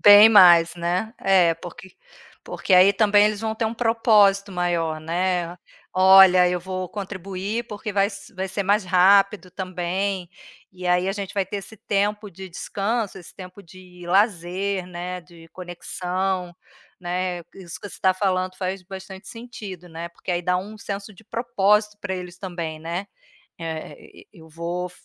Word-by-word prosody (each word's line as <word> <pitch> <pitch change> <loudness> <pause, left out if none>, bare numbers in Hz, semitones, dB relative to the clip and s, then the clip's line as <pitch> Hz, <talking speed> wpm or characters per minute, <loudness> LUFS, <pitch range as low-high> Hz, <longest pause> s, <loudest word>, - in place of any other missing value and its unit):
Bem 205 +1 +9
mais, 175 -6 +7
né, 180 +6 -2
eh, 185 -4 +4
porque 175 +2 -11 0.5
porque - - -3
aí 185 +2 +7
também 205 0 +4
eles 210 -1 -2
vão 220 0 -2
ter 220 0 -1
um 225 - -3
propósito 215 -4 +3
maior, 170 -3 -1
né. 175 +1 -1 0.4
"Olha, 185 -1 +7
eu 180 0 -1
vou 185 +1 -5
contribuir, 195 +3 -5
porque 210 0 -6
vai 200 0 +3
s 200 -1 -10
vai 190 +1 -3
ser 195 +2 -2
mais 205 +2 +2
rápido 190 +1 +4
também, 185 0 -3 0.4
e 180 0 -7
aí 180 +1 +2
a 195 - 0
gente 200 -2 -6
vai 200 -2 +1
ter 205 - -5
esse 210 +3 -11
tempo 205 +1 -1
de 190 +1 -10
descanso, 200 +4 -3
esse 175 - -14
tempo 185 +1 -11
de 180 0 -14
lazer, 190 0 0
né, 180 0 -6
de 170 -1 -17
conexão", 180 +1 -4 0.4
né, 180 0 -3
isso 180 -3 -9
que 205 - -7
você - - -12
está 185 -1 +2
falando 185 -1 -1
faz 190 0 -4
bastante 190 +1 -10
sentido, 210 -7 -9
né, 165 +1 -7
porque, 170 - -8
aí, 175 -1 0
dá 180 +1 +1
um 210 +4 -6
senso 200 +1 -6
de 215 +3 -18
propósito 210 -2 +1
para 190 -2 -3
eles 180 -1 -8
também, 170 -5 -5
né. 170 +5 -4 0.5
É,e 160 -1 -8
e 195 - -18
eu 160 - -14
vou 170 +2 -4
185 Hz, 165 wpm, -23 LUFS, 180-200 Hz, 0.5 s, Bem